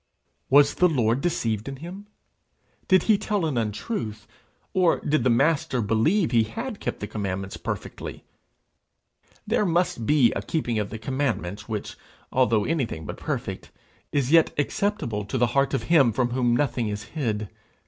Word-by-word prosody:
Was 145 +1 +6
the 180 - +4
Lord 125 -4 +1
deceived 115 - -1
in 135 - -6
him? 180 +8 -9 0.8
Did 185 0 +5
he 215 -3 +3
tell 205 -5 -1
an 150 -4 -1
untruth? 110 - -3 0.5
or 180 -3 +3
did 150 -4 +1
the 130 - +3
Master 135 +1 +2
believe 115 - +2
he 115 -2 +5
had 225 - -4
kept - - -4
the - - -2
commandments 95 -2 -4
perfectly? - - -6 1.2
There - - +1
must 175 - 0
be 140 -6 +5
a - - -2
keeping 120 -9 -1
of 105 - -2
the 110 - -6
commandments, 110 -5 -3
which, 105 -2 -4 0.3
although 115 -5 +2
anything 130 - -2
but - - -6
perfect, - - -4 0.4
is 140 -2 0
yet 165 -1 +6
acceptable 145 - -1
to 105 - -3
the 120 - +4
heart 140 0 +2
of - - -2
him 145 -8 +4
from 120 +2 0
whom 120 -1 +2
nothing 120 -4 0
is 105 +1 -4
hid. 110 -5 -3
130 Hz, 160 wpm, -25 LUFS, 110-160 Hz, 1.2 s, Was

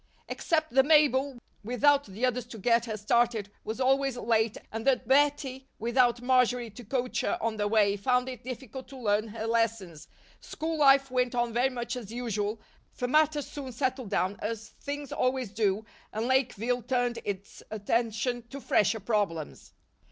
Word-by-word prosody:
Except 315 -1 -1
that 265 +2 +4
Mabel, 285 -4 +4 0.3
without 280 +5 +3
the 205 +6 -2
others 250 -1 -1
to 235 - -9
get 230 +2 +2
her 220 -2 -4
started, 220 -1 +1
was 220 +3 -5
always 270 0 +2
late 225 -2 +1
and 225 0 -4
that 255 -3 +2
Bettie, 270 -1 +2
without 240 +1 +2
Marjory 250 -2 +2
to 240 +4 -11
coach 250 +2 -1
her - - 0
on 225 -1 -2
the 205 0 0
way, 205 -2 +3
found 250 +4 +1
it 255 -2 -7
difficult 260 0 -7
to 270 - -11
learn 215 -2 +1
her 220 +1 -6
lessons, 225 -8 -1 0.3
school 320 +1 -4
life 275 -2 +5
went 250 -1 +1
on 240 -1 0
very 245 +3 +2
much 240 -1 -4
as 225 -4 -7
usual, 220 -3 -2 0.4
for 250 - -2
matters 300 +1 +3
soon 275 -3 -7
settled 255 -2 -2
down 190 +2 0
as 225 +1 -4
things 285 -1 -5
always 255 -4 0
do 210 -1 0 0.3
and 220 +2 -2
Lakeville 245 -2 +1
turned 245 0 0
its 200 -1 -6
attention 230 +3 -1
to 275 - -7
fresher 220 -3 +2
problems. 200 -8 -2
240 Hz, 165 wpm, -29 LUFS, 220-260 Hz, 0.4 s, life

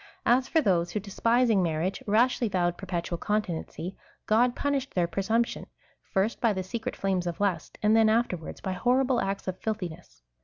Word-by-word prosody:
^ - - -20 0.2
As 250 +2 +4
for 320 - +3
those 175 - +2
who, - - 0
despising 225 +2 +2
marriage, 170 +2 -1
rashly 235 +2 +3
vowed 175 -2 +1
perpetual 175 -2 -4
continency, 190 -3 -3 0.3
God 240 +3 +3
pun 285 0 0
ished 270 -1 -3
their 175 -2 +3
presumption, 220 +7 -1 0.4
first, 195 +4 0
by 230 -3 +3
the 190 -1 -3
secret 230 +6 -4
flames 190 -2 -1
of 170 - -4
lust 190 -6 -1
f - - -24
and 215 +1 +5
then 225 -1 +5
afterwards, 215 -8 -1
by 190 - -3
horrible 250 +5 +2
acts 195 0 -3
of 185 0 -3
filthiness. 180 - -5
200 Hz, 185 wpm, -28 LUFS, 180-235 Hz, 0.4 s, and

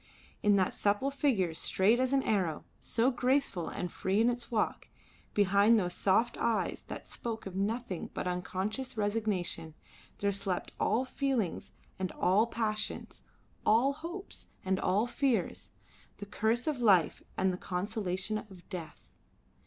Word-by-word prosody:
In 205 -1 +5
that 190 -2 +2
supple 205 +7 +1
figure 235 - +1
straight 195 +8 +2
as 260 0 +1
an 275 -1 +3
arrow, 185 -8 0
so 235 +3 +1
graceful 250 - +1
and 180 -2 -4
free 190 +2 0
in 235 +2 +4
its 240 0 -5
walk, 220 -3 -1 0.5
behind 205 +3 +5
those 180 -4 0
soft 220 +7 +2
eyes 230 -2 0
that - - -7
spoke 225 -2 -5
of 190 -2 -6
nothing 200 -1 -2
but - - -2
of 180 - +1
unconscious 215 +8 -3
resignation, 205 -7 -1 0.4
there 200 0 +1
slept 195 -2 -2
all 235 +5 +2
feelings 255 - -1 0.3
and 185 -1 -1
all 205 +5 +3
passions, 215 -2 -3 0.4
all 240 +6 +4
hopes 345 +6 -8 0.2
and 190 0 +1
all 205 +5 +2
fears, 250 0 0 0.5
the 205 - -7
curse 220 +4 0
of 300 -5 -1
life 195 -9 +4 0.2
and 190 0 +2
the - - -4
consolation 195 +1 -2
of 190 -5 -13
death. 170 -5 -7
210 Hz, 145 wpm, -31 LUFS, 190-240 Hz, 0.5 s, In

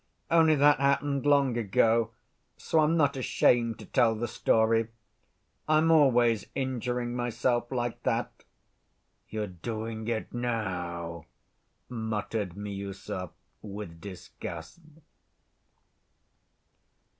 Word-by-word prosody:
Only 160 -2 +5
that 145 0 +5
happened 140 0 +1
long 140 -4 +4
ago, 115 +1 +2 0.5
so 160 - +1
I'm 155 +2 +3
not 145 -3 +3
ashamed 120 -3 +2
to - - -11
tell 115 -3 +3
the 120 +2 -2
story. 115 0 +2 0.8
I'm 155 +1 +4
always 120 -7 +4
injuring 125 -2 -2
myself 120 0 0
like 120 -2 -2
that." - - -2 0.9
"You're 110 -1 -2
doing 110 +4 -5
it 115 -2 -3
now," 90 -9 -3 0.6
muttered 110 -4 -3
Miüsov, 100 -2 -5 0.3
with 100 -5 -8
disgust. 90 - -8
115 Hz, 95 wpm, -28 LUFS, 105-130 Hz, 0.9 s, Only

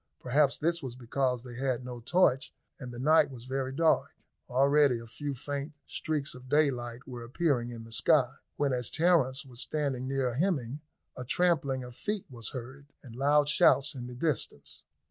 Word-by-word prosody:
Perhaps 140 +2 +2
this 170 +2 0
was 130 -4 -6
because 125 0 -1
they 125 -2 -9
had 130 0 -2
no 125 -1 -6
torch, 135 0 +2 0.3
and 125 -2 -7
the 120 - -8
night 155 +5 +4
was 125 -3 -10
very 130 0 -2
dark. 160 +4 +2 0.3
Already 140 0 +4
a 115 - -9
few 140 +5 -5
faint 145 +3 -4
streaks 150 -3 -2
of 125 0 -12
daylight 125 -5 +1
were 120 -2 -7
appearing 125 -1 0
in 115 -1 -8
the 115 - -13
sky, 130 +2 +3 0.2
when, 140 -2 +1
as 125 -1 -2
Terence 155 -6 +2
was 125 -3 -11
standing 140 -4 -2
near 135 -2 0
Hemming, 145 -3 -1 0.3
a 125 - -5
trampling 140 -3 +1
of 125 -1 -10
feet 210 - -3
was 115 -3 -5
heard, 135 +3 -8 0.2
and 120 -4 -11
loud 145 +3 +3
shouts 150 0 +4
in 125 -3 -6
the 125 - -8
distance. 145 -1 -3
130 Hz, 180 wpm, -30 LUFS, 125-145 Hz, 0.3 s, night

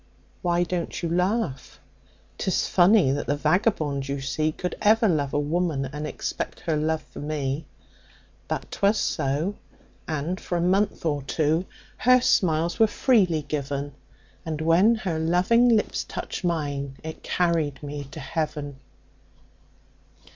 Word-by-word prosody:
"Why 175 0 +2
don't 175 0 -3
you 170 - 0
laugh? 180 - -1 0.6
'Tis 190 - 0
funny 185 -5 +5
that 145 - -2
the 145 - +1
vagabond 150 -4 +1
you 140 0 -2
see 155 +3 -1
Could 180 +3 -4
ever 220 +2 +5
love 145 -6 +1
a - - 0
woman, 155 -2 0
and 150 +3 -5
expect - - -4
her 160 - 0
love 155 +1 0
for - - -12
me; 145 -1 -3 0.8
But - - -4
'twas 200 +2 +2
so, 155 +7 -1 0.5
and 160 +4 -2
for 175 - -2
a - - 0
month 190 +2 +1
or 145 -3 0
two, 155 +5 0 0.3
her 255 0 +5
smiles 170 -7 +2
were 220 - +6
freely 190 - +2
given, 145 -1 -3 0.5
And 155 -2 -4
when 170 +8 +4
her 185 -7 -2
loving 180 +9 +3
lips 220 -3 +1
touched - - -6
mine, 145 -5 -2
it 160 0 -7
carried 165 -5 0
me 145 0 -5
to 145 +4 -10
Heaven. 150 -1 -3
160 Hz, 140 wpm, -25 LUFS, 145-180 Hz, 0.8 s, were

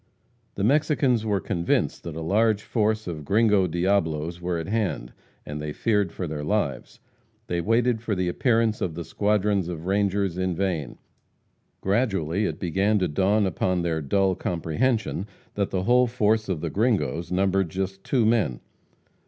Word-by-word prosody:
The 100 - -2
Mexicans 135 -3 +2
were 100 -2 +1
convinced 90 -3 -1
that 85 -3 -5
a 80 - -5
large 105 +5 +2
force 110 -1 0
of 80 -4 -5
Gringo 105 +2 +3
Diablos 85 -2 0
were 90 0 -1
at 80 - -4
hand, 95 - -2 0.3
and 75 0 -5
they 75 0 -4
feared 105 -3 +1
for 90 - -4
their 75 -2 -4
lives. 90 -5 -2 0.5
They 85 -1 -1
waited 115 +3 +2
for 115 -3 -1
the 90 -1 -1
appearance 115 +3 +1
of 85 -4 -2
the 85 - -4
squadrons 105 -1 +1
of 85 -2 -6
rangers 100 -2 0
in 95 -1 0
vain. 85 -8 -2 0.8
Gradually 100 -3 0
it - - -4
began 95 +4 +1
to 95 -3 +1
dawn 100 +7 +2
upon 90 -1 0
their 80 -2 -1
dull 95 +7 +2
comprehension 95 +5 -1 0.3
that 100 -1 -1
the 95 -1 -1
whole 125 +3 +4
force 110 -2 +1
of 85 -5 -2
the 85 - -3
Gringos 100 -6 0
numbered 95 -1 +1
just 95 +2 -4
two 125 -5 +1
men. 110 - +2
95 Hz, 160 wpm, -25 LUFS, 85-110 Hz, 0.8 s, whole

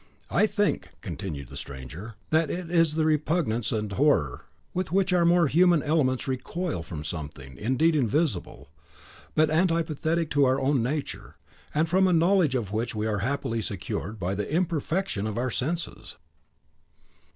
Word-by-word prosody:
"I 215 - +4
think," 205 -1 0
continued 70 -9 -6
the - - -10
stranger, 70 - -8 0.2
"that 160 -1 +3
it 175 +1 -4
is 165 -3 +3
the 160 -1 +2
repugnance 150 -7 +1
and 105 -2 -2
horror 100 - +1 0.3
with 185 -2 -2
which 190 0 +2
our 175 -1 +4
more 170 0 +5
human 170 +1 +4
elements 145 -5 +1
recoil 135 - -3
from 80 -2 -7
something, 70 -4 -6
indeed, 130 - +2
invisible, 120 - -1 0.7
but 155 0 +4
antipathetic 165 -1 +1
to 145 -1 +4
our 130 +1 +2
own 135 -1 +2
nature; 140 +5 -4 0.4
and 155 +2 +1
from 190 +3 +3
a 180 - +3
knowledge 170 -4 +3
of 110 -6 -2
which 110 +2 -2
we 105 0 -1
are 105 -2 0
happily 115 0 -1
secured 100 +2 -4
by 95 +1 -1
the 105 +5 -3
imperfection 170 - -1
of 110 - -4
our 125 +1 -1
senses." 165 +9 -3
145 Hz, 155 wpm, -27 LUFS, 105-165 Hz, 0.7 s, more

